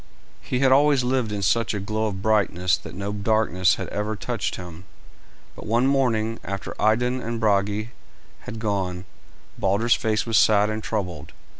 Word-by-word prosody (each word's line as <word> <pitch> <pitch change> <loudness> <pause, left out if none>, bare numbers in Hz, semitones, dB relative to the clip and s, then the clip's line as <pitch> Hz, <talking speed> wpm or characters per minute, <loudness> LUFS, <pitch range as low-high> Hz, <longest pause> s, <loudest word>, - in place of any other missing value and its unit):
He 125 - -2
had 135 -1 +4
always 140 -1 +4
lived 125 -3 0
in 100 -1 -3
such 115 +1 +1
a - - -2
glow 110 +3 -2
of 95 -2 -5
brightness 95 -5 +2
that - - -10
no 100 +2 -4
darkness 100 -4 +2
had - - -5
ever 105 +1 -2
touched 115 +1 -3
him; 90 0 -10 0.7
but - - -10
one 115 +4 +2
morning, 115 -5 +1
after 100 0 -5
Idun 125 +4 +2
and 115 0 -4
Brage 105 0 +1 0.5
had 115 - -8
gone, 95 -4 -2 0.5
Balder's 100 +5 +2
face 110 0 0
was 115 -2 +1
sad 105 0 +4
and 110 0 -3
troubled. 90 -10 -4
110 Hz, 165 wpm, -24 LUFS, 100-115 Hz, 0.7 s, had